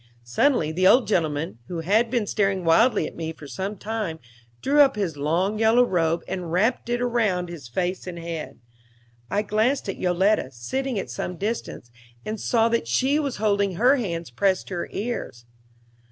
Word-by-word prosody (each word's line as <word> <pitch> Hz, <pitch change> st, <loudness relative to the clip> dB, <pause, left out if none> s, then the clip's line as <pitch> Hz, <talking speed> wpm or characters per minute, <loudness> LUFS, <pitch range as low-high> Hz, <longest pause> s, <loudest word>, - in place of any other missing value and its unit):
Suddenly 155 Hz, -, +2 dB
the 185 Hz, +3 st, +3 dB
old 245 Hz, +4 st, +6 dB
gentleman, 160 Hz, -, -1 dB
who 170 Hz, -2 st, -4 dB
had 215 Hz, +7 st, +2 dB
been 235 Hz, -3 st, 0 dB
staring 195 Hz, -3 st, 0 dB
wildly 190 Hz, +3 st, +4 dB
at -, -, -7 dB
me 160 Hz, -1 st, -4 dB
for 150 Hz, -2 st, -12 dB
some 195 Hz, +8 st, -4 dB
time, 210 Hz, -5 st, -3 dB, 0.4 s
drew 285 Hz, -, +2 dB
up 275 Hz, -4 st, +5 dB
his 190 Hz, -7 st, -2 dB
long 170 Hz, +9 st, 0 dB
yellow 225 Hz, +2 st, +5 dB
robe 170 Hz, -4 st, 0 dB
and 180 Hz, -3 st, -4 dB
wrapped 220 Hz, +8 st, +1 dB
it 240 Hz, +1 st, 0 dB
round 210 Hz, -8 st, 0 dB
his 165 Hz, -8 st, -8 dB
face 180 Hz, +9 st, -2 dB
and 175 Hz, -1 st, -6 dB
head. 165 Hz, -2 st, -6 dB, 0.7 s
I 205 Hz, -, 0 dB
glanced 220 Hz, +6 st, +1 dB
at -, -, -4 dB
Yoletta, 185 Hz, -2 st, +2 dB
sitting 255 Hz, -, -3 dB
at 195 Hz, -, -4 dB
some 180 Hz, -, -4 dB
distance, 205 Hz, -, -4 dB, 0.3 s
and 215 Hz, 0 st, -4 dB
saw 230 Hz, -1 st, +2 dB
that 230 Hz, -, 0 dB
she 265 Hz, -, +2 dB
was 280 Hz, -4 st, -2 dB
holding 200 Hz, -3 st, +1 dB
her 250 Hz, +8 st, +4 dB
hands 170 Hz, -, -4 dB
pressed 185 Hz, +10 st, 0 dB
to -, -, -6 dB
her -, -, -4 dB
ears. 200 Hz, -, -4 dB
195 Hz, 180 wpm, -24 LUFS, 165-225 Hz, 0.7 s, old